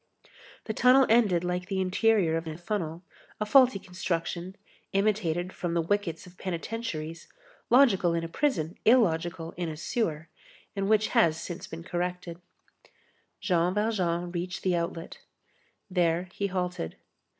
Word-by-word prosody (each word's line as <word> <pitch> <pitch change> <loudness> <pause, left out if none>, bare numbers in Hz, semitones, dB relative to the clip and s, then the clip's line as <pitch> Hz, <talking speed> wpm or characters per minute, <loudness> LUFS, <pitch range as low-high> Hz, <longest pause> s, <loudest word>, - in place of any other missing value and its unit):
The 220 - -3
tunnel 255 +4 +6
ended 210 -7 +4
like 180 +1 -2
the 195 -1 -2
interior 190 -2 +2
of 165 0 -3
a 155 0 -5
funnel; 175 -2 -3 0.4
a 215 - 0
faulty 255 -1 +6
construction, 180 0 -4 0.4
imitated 195 -3 0
from 170 -1 -3
the 170 - +3
wickets 175 -2 -1
of 180 0 -16
penitentiaries, 170 -3 -4 0.4
logical 200 -10 +5
in 165 - -1
a - - -3
prison, 170 - -1
illogical 175 -7 +2
in 175 -2 -2
a 155 - -6
sewer, 160 -4 -2 0.5
and 195 0 -1
which 215 0 +3
has 160 -1 +3
since 175 - -6
been 165 +1 -8
corrected. 180 0 -4 1.0
Jean 180 -1 +1
Valjean 180 -5 0
reached 180 +1 -4
the 185 -2 +2
outlet. 170 0 -4 0.7
There 175 -1 +1
he 200 - -1
halted. 180 - -3
180 Hz, 140 wpm, -28 LUFS, 170-205 Hz, 1.0 s, tunnel